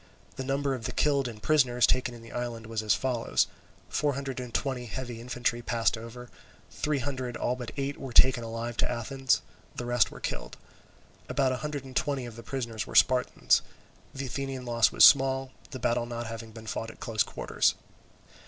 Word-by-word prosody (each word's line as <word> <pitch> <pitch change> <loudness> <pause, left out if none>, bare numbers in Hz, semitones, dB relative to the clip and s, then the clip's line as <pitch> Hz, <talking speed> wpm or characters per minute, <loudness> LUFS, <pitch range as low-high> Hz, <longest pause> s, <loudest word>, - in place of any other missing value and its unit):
The 130 - -4
number 135 +1 0
of 120 -4 -5
the - - -2
killed 140 -3 +2
and 110 -2 -9
prisoners 130 -6 +4
taken 125 -1 +1
in 115 - -12
the 115 - -12
island 120 -2 -4
was 110 -1 -2
as 105 -1 +3
follows: 125 -3 +1 0.4
four 145 -2 0
hundred 135 -2 -4
and 125 -1 -6
twenty 125 -1 -2
heavy 120 -1 -5
infantry 125 0 -1
had 120 - -13
passed 115 0 +2
over; 115 +2 -9 0.4
three 150 -1 -1
hundred 130 -2 -3
all 125 - 0
but 125 -2 -6
eight 140 0 -2
were 135 - -6
taken 125 0 +6
alive 115 +1 -4
to - - +1
Athens; 130 +3 0 0.3
the 120 - -4
rest 120 -3 +3
were - - -10
killed. - - -5 0.7
About 135 -2 +2
a 130 - -1
hundred 145 -1 -4
and 130 -1 -11
twenty 140 -3 0
of 120 -2 -8
the 115 - -8
prisoners 115 -3 -4
were - - -8
Spartans. 125 -1 +4 0.5
The 135 0 -5
Athenian 135 0 -4
loss 115 -1 +3
was - - +8
small, 135 -1 +5 0.2
the 130 - -6
battle 120 -1 0
not 120 0 -4
having 115 0 -7
been 110 0 -11
fought 115 +1 -3
at - - -13
close 115 -3 -1
quarters. - - +1
125 Hz, 200 wpm, -29 LUFS, 115-135 Hz, 0.7 s, was